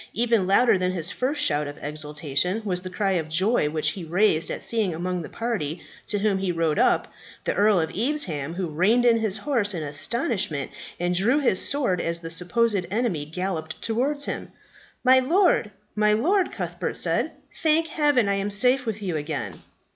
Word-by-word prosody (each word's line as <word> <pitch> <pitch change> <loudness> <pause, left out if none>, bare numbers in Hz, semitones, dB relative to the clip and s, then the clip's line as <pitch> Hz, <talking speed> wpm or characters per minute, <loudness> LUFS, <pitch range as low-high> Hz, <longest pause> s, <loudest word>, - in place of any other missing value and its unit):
Even 230 -4 +1
louder 200 +1 +4
than 180 0 0
his 175 -1 -1
first 290 +4 -1
shout 150 - +1
of 145 - -8
exultation 150 +6 -2
was 180 -3 -1
the 185 - -6
cry 195 +1 -1
of 165 -4 -1
joy 185 0 +1
which 155 0 0
he 180 +2 -5
raised 165 -1 +2
at - - -5
seeing 215 -7 0
among 180 +1 -2
the - - -8
party 195 -10 -3 0.3
to 205 - 0
whom 200 -1 +1
he 190 -2 -1
rode 165 -3 0
up, - - +3 0.4
the - - 0
Earl 205 -1 +4
of 160 - -1
Evesham, 185 - -2
who 185 0 -2
reined 190 +10 +2
in 230 -1 +5
his 220 -2 -1
horse 225 -9 0
in 160 - -3
astonishment, 150 - -2 0.3
and 175 +1 0
drew 210 +10 +2
his 260 -10 +2
sword 245 -11 +1
as 170 0 -2
the 165 -1 -6
supposed 195 +3 +1
enemy 200 -8 -1
galloped 165 0 -4
towards 280 +6 -1
him. - - -5 0.5
"My 260 0 +6
lord, 335 - +3 0.3
my 210 0 +3
lord!" 360 - +2
Cuthbert - - -4
said. - - +1 0.2
"Thank 320 +1 +2
heaven 290 -8 +2
I 200 0 +1
am 200 +1 -2
safe 250 +5 +2
with 215 -1 -3
you 175 -5 -1
again." 145 - -4
195 Hz, 185 wpm, -24 LUFS, 165-235 Hz, 0.5 s, My